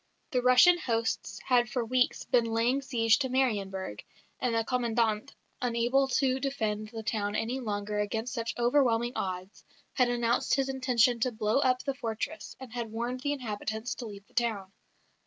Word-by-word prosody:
The 250 Hz, -, +1 dB
Russian 255 Hz, +8 st, +6 dB
hosts 230 Hz, -6 st, -2 dB
had 245 Hz, -2 st, +3 dB
for 245 Hz, -3 st, -1 dB
weeks 250 Hz, +2 st, +1 dB
been 240 Hz, -2 st, +3 dB
laying 230 Hz, +4 st, +1 dB
siege 230 Hz, -4 st, +2 dB
to 265 Hz, -2 st, -1 dB
Marienburg; 195 Hz, -, -1 dB, 0.4 s
and 245 Hz, -2 st, 0 dB
the 225 Hz, -, +2 dB
Commandant, 235 Hz, -1 st, 0 dB, 0.3 s
unable 245 Hz, +3 st, +2 dB
to 260 Hz, 0 st, +1 dB
defend 220 Hz, -6 st, -2 dB
the 225 Hz, -1 st, -7 dB
town 210 Hz, -2 st, -1 dB
any 240 Hz, +4 st, -1 dB
longer 210 Hz, -3 st, -3 dB
against 220 Hz, +3 st, -2 dB
such 230 Hz, -2 st, -3 dB
overwhelming 240 Hz, -1 st, +2 dB
odds, 185 Hz, +1 st, -4 dB, 0.3 s
had 250 Hz, -2 st, +3 dB
announced 240 Hz, -1 st, +1 dB
his 270 Hz, 0 st, 0 dB
intention 250 Hz, -2 st, +2 dB
to 250 Hz, +2 st, +1 dB
blow 215 Hz, +2 st, +1 dB
up 255 Hz, -2 st, +2 dB
the 275 Hz, -, -1 dB
fortress, 250 Hz, +4 st, -5 dB
and 260 Hz, -3 st, -10 dB
had 235 Hz, -3 st, -4 dB
warned 240 Hz, +3 st, -3 dB
the 285 Hz, +3 st, -1 dB
inhabitants 220 Hz, -2 st, -4 dB
to 240 Hz, -, -7 dB
leave 200 Hz, -1 st, -10 dB
the -, -, -29 dB
town. 215 Hz, -6 st, -1 dB
235 Hz, 170 wpm, -29 LUFS, 220-255 Hz, 0.4 s, Russian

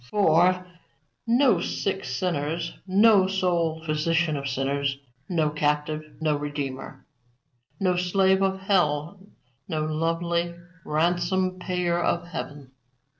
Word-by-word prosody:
For, 180 Hz, 0 st, +3 dB, 0.6 s
no 240 Hz, -4 st, +4 dB
sick 195 Hz, +1 st, -2 dB
sinners, 165 Hz, +4 st, -2 dB
no 200 Hz, 0 st, +5 dB
soul 175 Hz, -4 st, 0 dB
physician 160 Hz, +1 st, +1 dB
of 140 Hz, -1 st, -3 dB
sinners; 140 Hz, +1 st, -1 dB, 0.3 s
no 160 Hz, -4 st, +1 dB
captive, 150 Hz, +1 st, -1 dB
no 155 Hz, -2 st, +1 dB
Redeemer; 145 Hz, -2 st, -5 dB, 0.7 s
no 185 Hz, -2 st, +2 dB
slave 190 Hz, +1 st, +2 dB
of 190 Hz, 0 st, 0 dB
hell, 175 Hz, -3 st, +1 dB, 0.5 s
no 155 Hz, -3 st, -1 dB
lovely 170 Hz, +2 st, -1 dB, 0.3 s
ransom 180 Hz, +4 st, 0 dB
payer 180 Hz, -1 st, -1 dB
of 170 Hz, 0 st, 0 dB
heaven. 145 Hz, -6 st, -7 dB
170 Hz, 105 wpm, -25 LUFS, 150-185 Hz, 0.7 s, no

